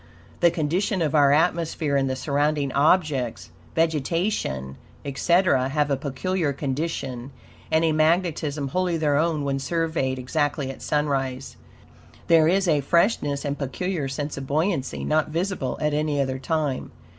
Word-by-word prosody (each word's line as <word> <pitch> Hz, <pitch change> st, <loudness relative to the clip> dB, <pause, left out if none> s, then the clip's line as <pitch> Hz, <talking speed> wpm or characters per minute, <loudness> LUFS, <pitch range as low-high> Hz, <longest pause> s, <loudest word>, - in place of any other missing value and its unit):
The 175 Hz, -, +5 dB
condition 175 Hz, +4 st, -1 dB
of 150 Hz, -, -1 dB
our 145 Hz, -2 st, +5 dB
atmosphere 160 Hz, -1 st, +1 dB
and 135 Hz, -1 st, +1 dB
the 130 Hz, -, -1 dB
surrounding 145 Hz, +1 st, 0 dB
objects 145 Hz, -5 st, +1 dB, 0.2 s
vegetation, 160 Hz, -, -1 dB, 0.3 s
etc. 140 Hz, -1 st, +2 dB
have 145 Hz, 0 st, 0 dB
a -, -, +3 dB
peculiar 145 Hz, +4 st, -2 dB
condition 135 Hz, -3 st, -3 dB, 0.4 s
and 160 Hz, +1 st, +3 dB
a 160 Hz, -, +3 dB
magnetism 155 Hz, -3 st, +1 dB
wholly 180 Hz, +2 st, 0 dB
their 150 Hz, -2 st, +1 dB
own 160 Hz, -1 st, +1 dB
when 135 Hz, -1 st, -1 dB
surveyed 160 Hz, -3 st, -1 dB
exactly 140 Hz, +1 st, -1 dB
at 135 Hz, -, -12 dB
sunrise. 135 Hz, -3 st, -1 dB, 0.7 s
There 165 Hz, -2 st, +6 dB
is 190 Hz, +2 st, +2 dB
a 150 Hz, -3 st, +3 dB
freshness 145 Hz, -, +1 dB
and 145 Hz, 0 st, -3 dB
peculiar 145 Hz, +4 st, -2 dB
sense 145 Hz, +2 st, -4 dB
of 135 Hz, -1 st, -6 dB
buoyancy 155 Hz, -1 st, -1 dB
not 155 Hz, 0 st, +1 dB
visible 165 Hz, -5 st, -2 dB
at 150 Hz, -1 st, 0 dB
any 150 Hz, -1 st, 0 dB
other 130 Hz, -1 st, -1 dB
time. 145 Hz, -1 st, -2 dB
150 Hz, 145 wpm, -24 LUFS, 135-165 Hz, 0.7 s, There